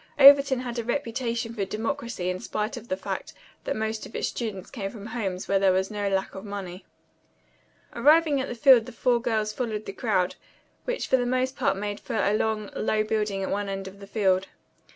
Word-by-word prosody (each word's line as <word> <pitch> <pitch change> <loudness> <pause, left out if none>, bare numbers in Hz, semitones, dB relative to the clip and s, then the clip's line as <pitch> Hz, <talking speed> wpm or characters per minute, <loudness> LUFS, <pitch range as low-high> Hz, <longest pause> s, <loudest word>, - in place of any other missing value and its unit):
Overton 275 -2 +8
had 245 -1 -4
a - - -2
reputation 235 -2 -2
for 210 -4 -2
democracy 225 -1 -2
in 180 - -4
spite 215 +7 -3
of 240 -1 -9
the 185 - -2
fact - - -5 0.3
that - - -1
most 220 0 -2
of - - -14
its - - 0
students 210 -6 -5
came 200 -7 -4
from 205 -1 -10
homes 205 -5 -3
where 195 - +3
there 195 -1 +4
was 190 +2 0
no 205 -1 -1
lack 195 0 -1
of 190 - -8
money. 195 -3 -7 1.1
Arriving 295 +2 +4
at 265 - -3
the 245 - -5
field 250 -2 +6
the - - -7
four 240 0 +2
girls 215 -2 0
followed 220 -4 -3
the 195 - -6
crowd, 190 -6 0 0.5
which - - -2
for 260 - +3
the 245 - 0
most 255 +1 0
part 220 -6 +1
made 205 0 -3
for 250 - -5
a 200 -1 +2
long, 215 -1 -1
low 215 0 +1
building 210 -2 -1
at - - -3
one 205 0 -1
end 195 0 -4
of 195 +1 -11
the 200 - -10
field. 195 -3 +1
215 Hz, 215 wpm, -26 LUFS, 195-245 Hz, 1.1 s, Overton